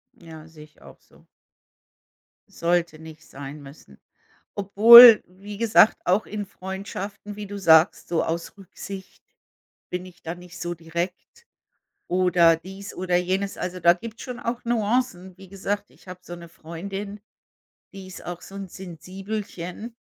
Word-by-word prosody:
Ja, 160 -2 -13
sehe 160 -2 -14
ich 150 - -27
auch - - -16
so. - - -24 1.2
Sollte 170 -2 -1
nicht 160 -1 -13
sein 140 +2 -9
müssen. 135 - -15 0.6
Obwohl, 225 +4 +9
wie 200 +3 -11
gesagt, 225 -1 +4
auch 190 +5 +2
in 210 -1 -5
Freundschaften, 195 +2 -8
wie 210 -1 -7
du 205 0 -7
sagst, 160 -2 +4
so 170 - 0
aus 165 +4 -5
Rücksicht, 195 0 -11 0.7
bin 180 +1 -5
ich 180 -1 -17
da 165 +1 -5
nicht 180 0 -13
so 175 0 -4
direkt 170 - -6 0.6
oder 175 -2 +4
dies 195 +3 -10
oder 180 -1 0
jenes. 190 +2 -2
Also, 180 0 -5
da 170 0 +5
gibt's 225 +5 -10
schon 250 -1 -7
auch 240 +1 -4
Nuancen. 215 -5 -1
Wie 190 -2 -14
gesagt, 200 +1 -4
ich - - -23
habe 180 0 -9
so 175 - -9
'ne 170 0 -12
Freundin, 195 +6 -8 0.7
die 195 -1 -10
ist 185 - -11
auch 175 0 -7
so 195 - -13
'n 195 -1 -7
Sensibelchen. 190 +4 -8
185 Hz, 150 wpm, -24 LUFS, 170-200 Hz, 1.2 s, Obwohl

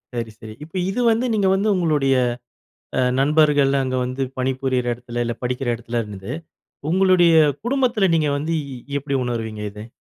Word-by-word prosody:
சரி, 115 -2 -3
சரி. 110 -1 -9
இப்ப 160 +4 -13
இது 210 +6 -1
வந்து 230 +3 +1
நீங்க 200 -3 +2
வந்து 195 +3 +1
உங்களுடைய 150 -6 +2 0.8
அ - - +2 0.2
நண்பர்கள், 145 -1 +4
அங்க 130 0 -2
வந்து 130 +2 -4 0.2
பணிபுரியிற 130 -1 -1
இடத்தில 120 0 -5
இல்ல 120 - -1
படிக்கிற 125 +1 -2
இடத்தில 120 0 -3
இருந்தது. 105 +1 -8 0.6
உங்களுடைய 185 -1 +4 0.3
குடும்பத்தில 240 -7 +2
நீங்க 155 -2 +2
வந்து 155 +3 -2 0.5
எப்பிடி 140 0 -3
உணர்வீங்க, 110 -3 -4
இத 105 +2 -10
135 Hz, 150 wpm, -21 LUFS, 120-170 Hz, 0.8 s, நண்பர்கள்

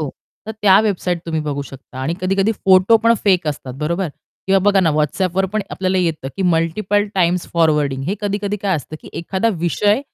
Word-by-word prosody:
हो, 150 -3 -3 0.4
तर 220 - -4
त्या 195 0 +6
वेबसाईट 185 -4 -1
तुम्ही 160 -1 -1
बघू 145 -2 -3
शकता 135 -1 -12
आणि 160 +6 -1
कधी-कधी 195 +3 +1
फोटो 190 +1 +4
पण 230 +1 +3
फेक 185 -5 +3
असतात, 135 -3 -5
बरोबर? 170 +5 -2 0.4
किंवा 195 0 +4
बघा 200 -1 +4
ना 165 -3 +2
WhatsAppवर 185 +5 0
पण 215 -1 0
आपल्याला 185 0 -1
येतं, 160 -6 -1
की 195 - -2
मल्टिपल 185 +4 +1
टाइम्स 180 -1 +1
फॉरवर्डिंग 150 -5 +1
हे. 190 - 0
कधी-कधी 205 0 -2
काय 195 -2 +1
असतं, 155 +1 -8
की - - -13
एखादा 190 +6 -1 0.2
विषय 205 +7 +2
185 Hz, 190 wpm, -19 LUFS, 160-200 Hz, 0.4 s, त्या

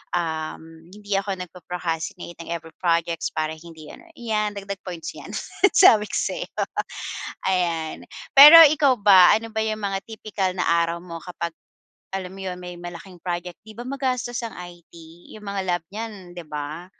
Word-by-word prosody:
um, 160 -1 -4
hindi 205 -1 -6
ako 195 0 -2
nagpo-procrastinate 175 -2 -5
ng 165 - -8
every 165 -1 -7
projects 170 -1 0
para 155 0 -2
hindi 160 -2 -13
ano, 345 - -14
iyan 215 -3 -1
dagdag 200 -1 -6
points 175 -3 -6
'yan, - - -10 0.4
sabi 220 - +7
ko - - -4
sa - - -1
iyo. - - -5 0.9
Ayan, 170 -4 -1 0.4
pero 300 +4 +12
ikaw 285 -3 +3
ba 190 -3 +8
ano 225 +1 -4
ba 220 0 -1
yung 215 0 -3
mga 195 -1 -1
tipikal 210 -4 -3
na 180 - -1
araw 170 0 +1
mo 170 -2 -7
kapag 170 -2 -5 0.6
alam 190 -1 -4
mo 195 - -11
yun? 185 -1 -4
May 180 -1 -8
malaking 175 +1 -10
project, 175 -1 -5
di 215 - -12
ba, 240 - -6
magastos 255 -3 -2
ang 225 - -8
IT 175 -1 -12 0.4
yung 210 - -12
mga 200 -1 -3
lab 175 -2 0
niyan, 205 -5 -8
di 175 - -6
ba? 150 +3 -6
180 Hz, 170 wpm, -23 LUFS, 170-210 Hz, 0.9 s, pero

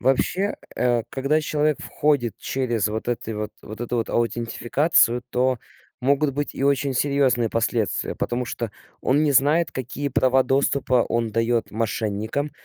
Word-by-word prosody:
Вообще, 180 +10 +1 0.2
э, 120 -2 +2
когда 140 +4 +1
человек 150 -1 0
входит 140 -6 0
через 120 -6 -1
вот 110 +2 -4
эти 120 -2 -2
вот 105 -1 -3
вот 110 +2 -9
эту 120 0 -2
вот 115 - -1
аутентификацию, 120 +2 +2
то 130 0 +1 0.4
могут 140 +2 +2
быть 145 +1 -3
и - - -4
очень 140 0 +2
серьезные 130 -3 +2
последствия, 115 -1 -1
потому 125 +1 -2
что 115 -1 -4 0.3
он 140 +4 +2
не 150 -2 +2
знает, 150 +5 +3
какие 130 +3 -3
права 130 0 +3
доступа 130 -2 +2
он 115 -1 0
дает 115 +1 +1
мошенникам, 110 +5 -2
125 Hz, 145 wpm, -23 LUFS, 115-140 Hz, 0.4 s, знает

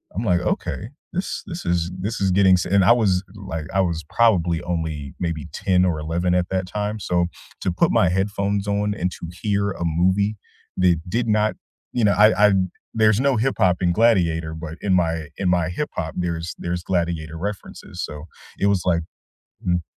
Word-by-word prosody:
I'm 110 +4 -2
like, 90 -3 +2
"Okay. 100 +4 -2 0.2
This 185 +2 -3
this 170 0 -7
is 85 0 0
this 105 +5 -3
is 95 -1 +2
getting 95 0 +5
s" 90 - -1
and 100 +1 +3
I 95 - +6
was 100 -6 +3
like 80 -6 -6
I 95 - +2
was 85 -4 0
probably 90 -8 +3
only 80 -5 -3
maybe 85 -3 -3
10 90 -1 +2
or 80 -4 0
11 85 +3 0
at 90 0 0
that 95 -1 -1
time, 105 +2 -3
so 90 -2 +1 0.3
to 90 - 0
put 85 - +2
my 90 - +4
headphones 100 +1 -1
on 105 0 0
and 90 -2 -1
to 85 - -8
hear 100 -1 0
a 85 -2 -4
movie 95 +6 +2 0.4
that 90 -3 +3
did 115 +4 -1
not 105 0 +2 0.4
you 120 - 0
know, 105 - +5
I 105 -1 +6
I - - +3 0.4
there's 110 -1 +4
no 135 -1 +2
hip-hop 110 -7 +2
in 90 -1 +3
Gladiator, 85 -7 +2
but 80 0 -7
in 95 -2 +1
my 80 -3 0
in 95 -2 0
my 90 -1 +2
hip-hop, 90 - -4
there's 85 -1 -3
there's 90 0 -3
Gladiator 85 -3 -2
references, 100 +3 -6
so 75 0 -6 0.4
it 100 - +2
was 100 -3 +2
like 85 -2 +2 0.7
Mm. 90 -2 +1
90 Hz, 190 wpm, -22 LUFS, 85-100 Hz, 0.7 s, I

